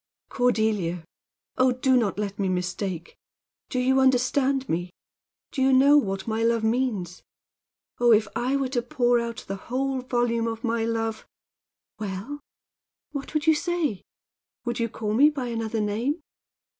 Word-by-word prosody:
"Cordelia! 215 -9 0 0.5
Oh, 255 0 +5
do 255 +1 +2
not 220 -6 +1
let 205 -1 -3
me 195 -1 +1
mistake! 180 -1 -3 0.5
Do - - -3
you 260 +1 +3
understand 265 +1 +2
me? 175 +2 -2 0.6
Do 265 - -3
you 265 +1 +4
know 275 +3 +6
what 195 -9 +1
my 220 0 -1
love 230 -1 +2
means? 220 -7 -1 0.8
Oh, 240 0 +5
if 215 -1 +5
I 245 +4 0
were 270 -2 0
to 250 -2 0
pour 245 -2 +2
out 235 -1 -5
the 195 - -4
whole 265 +1 -1
volume 240 -2 0
of 225 0 -4
my 230 -1 0
love 225 -1 -2 0.3
" - - -53
"Well 210 +8 -5 0.7
what 285 +1 -6
would 305 0 +1
you 320 - +6
say? 315 - -1 0.6
Would 240 0 -2
you 230 0 0
call 210 -1 -3
me 280 +7 +6
by 270 -5 -4
another 225 -1 -2
name?" 225 +9 -1
235 Hz, 155 wpm, -25 LUFS, 215-265 Hz, 0.8 s, know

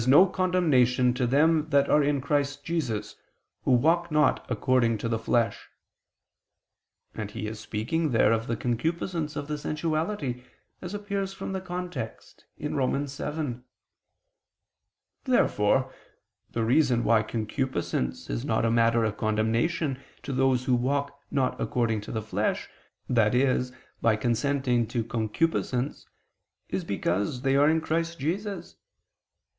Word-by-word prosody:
no 145 +8 +8
condemnation 150 -10 +2
to 125 0 0
them 155 +4 +3
that 140 -1 +3
are 150 - +4
in 145 0 +1
Christ 145 0 -1
Jesus, 120 -11 -2 0.5
who - - +2
walk 165 +7 +3
not 150 -2 +3
according 125 -4 +2
to 110 - -3
the 115 -1 -1
flesh": 115 0 0 1.4
and 105 -2 -5
he 105 - -5
is 105 0 -5
speaking 135 +12 -1
there 115 -3 +4
of 115 0 0
the 115 - 0
concupiscence 160 - -2
of 145 -1 -4
the 150 -1 -3
sensuality, 155 -3 -2 0.4
as 180 +2 -5
appears 200 -1 -3
from 195 - -5
the 190 - -3
context 180 -9 -6
(Rom. 135 +1 0
7). 140 -2 -4 1.6
Therefore 130 - +2 0.6
the 115 -1 -1
reason 125 -1 +3
why 115 -2 +4
concupiscence 110 - -2
is - - -3
not - - +1
a 115 - +2
matter 115 0 +3
of 110 - -2
condemnation 115 +7 0 0.2
to 135 +2 -4
those 130 -1 +2
who 130 - +2
walk 140 +3 0
not 135 -2 0
according 115 -3 0
to - - -8
the 110 -1 -3
flesh, 110 - -1 0.5
i.e. 125 +4 +3 0.4
by 110 -1 +4
consenting 125 +1 +1
to 120 0 -1
concupiscence, 125 +4 -1 0.6
is - - -2
because 100 +8 -1
they 135 0 +2
are 145 +2 +5
in 160 0 +2
Christ 165 +1 -1
Jesus. 195 +8 -4
130 Hz, 135 wpm, -27 LUFS, 115-155 Hz, 1.6 s, no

